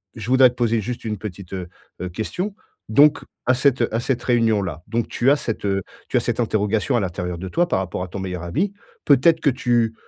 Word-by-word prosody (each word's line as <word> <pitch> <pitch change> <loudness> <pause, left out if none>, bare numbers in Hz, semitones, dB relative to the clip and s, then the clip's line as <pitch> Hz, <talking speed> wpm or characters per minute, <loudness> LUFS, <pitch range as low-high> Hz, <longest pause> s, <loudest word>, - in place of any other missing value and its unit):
je 110 -2 -7
voudrais 130 -1 +7
te 125 - -12
poser 115 -2 +1
juste 120 +2 -5
une 105 -3 -3
petite, 95 -3 -8
heu 90 -2 -4 0.3
heu, 90 - -3
question. 180 - -4 0.3
Donc, 145 +7 +5 0.2
à 130 - +4
cette 130 -1 +2
à 115 - +1
cette 125 0 -1
réunion-là, 105 - +1
donc 115 +1 -1
tu 125 - +2
as 145 - +6
cette 115 -6 -4
heu, 95 -1 0 0.3
tu - - +2
as - - +5
cette - - -2
interrogation 110 -2 +1
à - - +3
l'intérieur 90 -2 -3
de 95 - -6
toi 175 +1 +1
par - - +1
rapport 95 -1 -4
à 90 - -3
ton 95 - -7
meilleur 90 -2 -4
ami. 160 - -1 0.3
Peut-être 160 +4 +5
que 145 - +3
tu 120 -3 +1
115 Hz, 225 wpm, -22 LUFS, 95-130 Hz, 0.3 s, voudrais